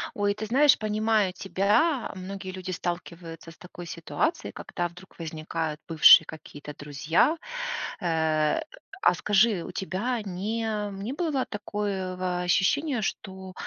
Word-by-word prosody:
Ой, 205 0 +1
ты 215 +1 -5
знаешь, 275 +6 +5
понимаю 215 -2 +1
тебя, 205 - +1
многие 190 0 -6
люди 185 0 -7
сталкиваются 170 -2 -5
с 165 - -14
такой 175 -1 -10
ситуацией, 170 - -2
когда 175 -2 -3
вдруг 180 +2 -16
возникают 160 -1 -4
бывшие 160 0 +8
какие-то 150 -2 -10
друзья. 150 - +1 0.6
Э, 160 - +1 0.4
а 175 - +5
скажи, 205 0 +3
у - - -7
тебя 220 +6 -2
не 210 +4 -3 0.4
не 245 +5 -3
было 300 -5 -1
такое 200 -3 -3
ва 180 -1 -2
ощущения, 235 - +2
что, 190 -2 -5
185 Hz, 125 wpm, -27 LUFS, 170-215 Hz, 0.6 s, бывшие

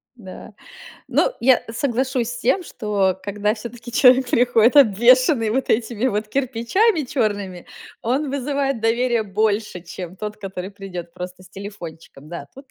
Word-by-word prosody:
Да. 205 -1 -11 0.6
Но - - +2
я 255 +1 +4
соглашусь 250 0 -1
с 245 - -6
тем, 370 +8 +1
что 200 - -1
когда 210 +1 -1
всё-таки 235 +1 -9
человек 255 +1 +5
приходит, 245 -1 +4
обвешенный 240 0 +5
вот 260 +4 -1
этими 230 +1 0
вот 215 -2 -1
кирпичами 275 - +1
чёрными, 205 -8 -2 0.4
он 265 +5 0
вызывает 275 -2 -1
доверия 235 +1 +1
больше, 210 -1 -1
чем 180 +1 -8
тот, 210 +1 -5
который 195 -1 -6
придёт 180 -4 -8
просто 180 +1 -8
с - - -16
телефончиком. 170 -7 -10
Да, 165 -4 -7
тут, 270 0 -14
225 Hz, 140 wpm, -21 LUFS, 195-255 Hz, 0.6 s, человек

